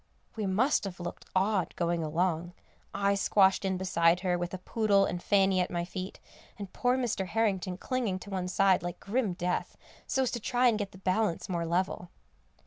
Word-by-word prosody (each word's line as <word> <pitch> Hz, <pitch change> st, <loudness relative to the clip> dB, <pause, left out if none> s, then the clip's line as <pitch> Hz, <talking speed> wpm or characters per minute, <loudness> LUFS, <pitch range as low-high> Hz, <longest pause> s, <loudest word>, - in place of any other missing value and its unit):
We 215 Hz, -3 st, -2 dB
must 235 Hz, +10 st, +2 dB
have 185 Hz, -3 st, -6 dB
looked 175 Hz, 0 st, -6 dB
odd 190 Hz, -1 st, +1 dB
going 170 Hz, -1 st, 0 dB
along; 170 Hz, +2 st, -1 dB, 0.4 s
I 200 Hz, 0 st, +1 dB
squashed 195 Hz, -1 st, +3 dB
in 190 Hz, -1 st, 0 dB
beside 175 Hz, -1 st, +2 dB
her 180 Hz, -2 st, +1 dB
with 175 Hz, 0 st, -3 dB
a 185 Hz, -, -4 dB
poodle 200 Hz, +1 st, +2 dB
and 175 Hz, -1 st, -3 dB
Fanny 195 Hz, -1 st, +3 dB
at 180 Hz, -, -1 dB
my 175 Hz, -1 st, -2 dB
feet, 185 Hz, +1 st, -6 dB, 0.4 s
and 200 Hz, -3 st, -8 dB
poor 250 Hz, +1 st, +1 dB
Mr. 225 Hz, -7 st, -1 dB
Harrington 190 Hz, -3 st, 0 dB
clinging 240 Hz, -5 st, -1 dB
to 200 Hz, -, -10 dB
one 185 Hz, -2 st, -2 dB
side 190 Hz, 0 st, +3 dB
like 175 Hz, 0 st, -5 dB
grim 210 Hz, -1 st, -1 dB
death, 180 Hz, 0 st, -2 dB, 0.3 s
so 265 Hz, -, +1 dB
as 250 Hz, -, -1 dB
to 240 Hz, -, -3 dB
try 245 Hz, +3 st, +2 dB
and 220 Hz, -2 st, 0 dB
get 200 Hz, -1 st, -3 dB
the -, -, -13 dB
balance 190 Hz, 0 st, 0 dB
more 170 Hz, -2 st, -1 dB
level. 175 Hz, 0 st, -1 dB
190 Hz, 195 wpm, -30 LUFS, 180-205 Hz, 0.4 s, squashed